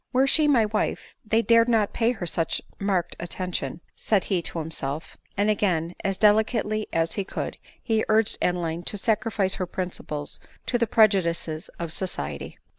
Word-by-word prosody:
" - - -47
Were 260 +2 +4
she 300 +2 +4
my 250 -7 +5
wife, 210 0 -2
they 220 +1 +2
dared 230 0 +5
not 220 -3 +2
pay 230 +1 +2
her 200 -7 -4
such 165 -1 0 0.2
marked 190 -4 0
attention," 175 -3 -3
said 205 -4 +1
be 185 -3 +2
to 170 - -4
himself; 155 -2 -4 0.2
and 205 +1 +2
again, 180 -6 +1
as 195 -1 0
delicately 215 0 +2
as 165 0 0
he 200 - -1
could, - - -5 0.2
he 220 -2 +1
urged 220 0 +2
Adeline 170 -2 0
to 205 - -3
sacrifice 210 -2 +1
her 180 - -1
principles 175 -5 -5 0.3
to 245 - 0
the 235 - +2
pre 220 0 +7
judices 170 -4 -2
of 165 -2 -4
society. 75 - -3
195 Hz, 175 wpm, -25 LUFS, 170-220 Hz, 0.3 s, pre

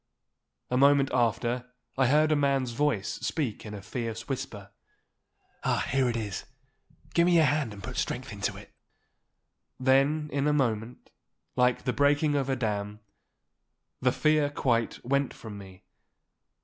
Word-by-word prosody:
A 125 - +2
moment 140 0 +5
after 120 +1 0 0.2
I 130 -1 +3
heard 155 +3 +4
a - - +4
man's 140 -3 +1
voice 120 -5 -1
speak 125 -9 -2
in 105 - -6
a 100 - -9
fierce 115 +1 -5
whisper. 105 -7 -5 0.9
'Ah, - - +1
here 130 -1 +2
it 115 - -1
is! 105 -4 -4 0.7
Give 170 0 +4
me 175 - +4
your 160 -2 +6
hand 145 -5 +1
and 100 -1 -10
put - - -6
strength - - -2
to - - -1
it.' - - -14 1.1
Then 135 +4 +3
in 140 +1 +1
a 150 - +3
moment, 120 -4 -1 0.4
like 125 -1 +2
the 125 - 0
breaking 145 +1 +3
of 140 -2 0
a 135 - +2
dam, 105 -3 -3 1.0
the - - +3
fear 155 -1 +2
quite 120 -6 -1
went 140 +2 0
from 105 -3 -9
me. 95 -2 -13
130 Hz, 150 wpm, -28 LUFS, 115-145 Hz, 1.1 s, your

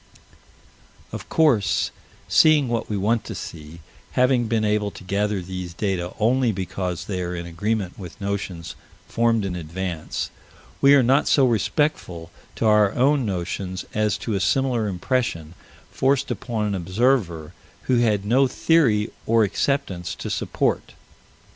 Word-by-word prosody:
Of - - -8
course, 140 -11 +2 0.4
seeing 155 -4 +5
what 115 -1 -2
we 105 - -1
want 110 +3 +1
to - - -6
see, 80 +1 -9 0.3
having 125 -2 +3
been 110 -1 +1
able 105 -1 +1
to 100 - -12
gather 100 +1 -1
these 90 -1 -6
data 90 -2 -2
only 120 +2 +2
because 90 -2 -4
they 95 -3 -3
are 90 0 -3
in 85 0 -5
agreement 95 +3 -3
with 90 -4 -9
notions 100 -4 -4 0.3
formed 115 -3 +1
in 90 -2 -3
advance, 85 0 -4 0.5
we 140 +1 +7
are 135 - +5
not 135 +4 +3
so 135 - +4
respectful 110 - -1 0.2
to - - -2
our 105 -1 +4
own 135 -1 +2
notions 95 0 -4
as 105 -1 +1
to 115 - -1
a 100 - 0
similar 125 0 +1
impression 90 - -2 0.4
forced 135 +1 +1
upon 115 -3 -2
an 105 - -1
observer 95 - 0 0.3
who 125 - +2
had 105 -4 +1
no 130 +5 +4
theory 125 -7 +2 0.2
or 115 0 +4
acceptance 100 -5 -1
to - - -6
support. - - -1
105 Hz, 145 wpm, -23 LUFS, 90-120 Hz, 0.5 s, we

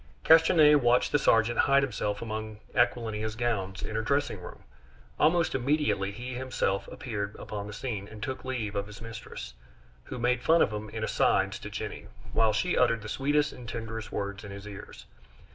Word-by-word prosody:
Castanier 160 -2 +7
watched 125 -1 +3
the 145 - +3
sergeant 115 -2 +3
hide 140 0 +5
himself 105 -5 -2
among 110 -1 -5 0.2
Aquilina's 110 -3 0
gowns 100 -5 -2
in 110 - -4
her 110 - +1
dressing 140 -4 0
room. - - -10 0.6
Almost 165 +2 +3
immediately 135 -7 +1
he 125 +5 -6
himself 125 -6 -1
appeared 110 -5 -5
upon 105 -1 -6
the - - -7
scene, 105 -4 -4
and 105 0 -9
took 130 +2 -4
leave 120 -6 -3
of 100 0 -2
his 105 -1 -11
mistress, 115 0 -8 0.5
who - - -6
made 125 +1 +1
fun 165 +5 +5
of - - -1
him 105 0 -5
in 110 0 -5
"asides" - - +2
to - - -7
Jenny, - - -6 0.3
while 110 -1 +4
she 180 - 0
uttered 115 -3 +3
the 105 - -6
sweetest 145 +4 +1
and 120 -2 -9
tenderest 115 -1 -5
words 100 0 -4
in 100 - -8
his 100 +1 -8
ears. 100 -1 -10
115 Hz, 180 wpm, -29 LUFS, 105-130 Hz, 0.6 s, Castanier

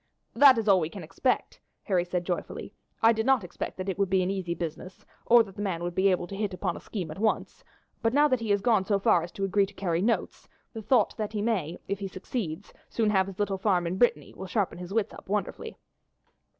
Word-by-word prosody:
"That 275 -4 +7
is 220 -1 -1
all 195 -2 +6
we 160 -2 -2
can 190 -1 -9
expect," 255 +10 -1 0.2
Harry 185 -4 +1
said 180 0 -2
joyfully. 175 -1 -4 0.3
"I 225 +1 +7
did 220 0 -1
not 265 -3 +3
expect 180 - -6
that 185 +1 -5
it 195 0 -3
would 200 -2 +2
be 190 0 +3
an 185 - -1
easy 185 -3 -3
business, 170 +3 -7 0.2
or 235 -1 +7
that 195 -3 -13
the 205 - -6
man 180 -4 -2
would 175 0 -3
be 190 +2 +3
able 180 -1 +1
to 195 - -8
hit 200 -2 -2
upon 180 -2 -2
a - - -7
scheme 180 -7 -5
at 155 - -8
once; 220 0 -1 0.4
but 225 - +2
now 290 +3 +5
that 255 -4 +1
he 225 -2 -4
has 205 -1 +2
gone 220 -4 +3
so 200 +1 +1
far 195 -3 +3
as 170 +1 -7
to 195 - -2
agree 195 0 +2
to 200 - -16
carry 175 -3 -1
notes, 230 +4 -1 0.2
the 225 - -6
thought 240 +4 +2
that 215 -1 -3
he 210 - -1
may, 185 -8 -1
if 200 0 -2
he 195 - -3
succeeds, 185 -3 -5 0.2
soon 220 -2 +1
have 190 -2 +2
his 195 -2 -8
little 200 -2 -1
farm 185 -4 +2
in 180 +3 -3
Brittany, 245 - +2
will 190 - -7
sharpen 195 -2 -1
his 180 +1 -8
wits 220 0 0
up - - -13
wonderfully." 210 0 -3
195 Hz, 250 wpm, -28 LUFS, 180-220 Hz, 0.4 s, That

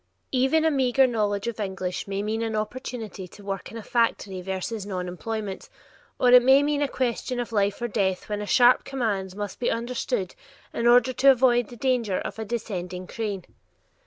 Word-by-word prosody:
Even 270 +5 +2
a 320 - +4
meager 265 -1 +3
knowledge 210 -4 0
of 235 -2 -4
English 190 -3 -3
may 195 0 -2
mean 220 +2 -2
an 225 -1 -2
opportunity 215 -3 -5
to 205 - -15
work 195 -1 -5
in 230 - -7
a 225 - -7
factory 205 -6 0
versus 190 +3 -4
nonemployment, 195 +2 -5 0.5
or 250 - +4
it 250 0 +9
may 265 +3 +6
mean 290 0 0
a 290 - +2
question 250 -1 -2
of 240 -1 -4
life 205 -2 +1
or - - +1
death 190 -4 -1
when 210 -1 -3
a 205 - -5
sharp 245 +2 +5
command 205 -8 -2
must 205 -2 -5
be 245 - +1
understood 235 -4 -2 0.4
in 235 - 0
order 245 +1 +5
to 270 +3 +5
avoid 245 -3 +4
the 240 - -10
danger 235 -6 0
of - - -5
a 220 - -3
descending 185 -5 -4
crane. 205 -3 -4
225 Hz, 190 wpm, -25 LUFS, 200-245 Hz, 0.5 s, it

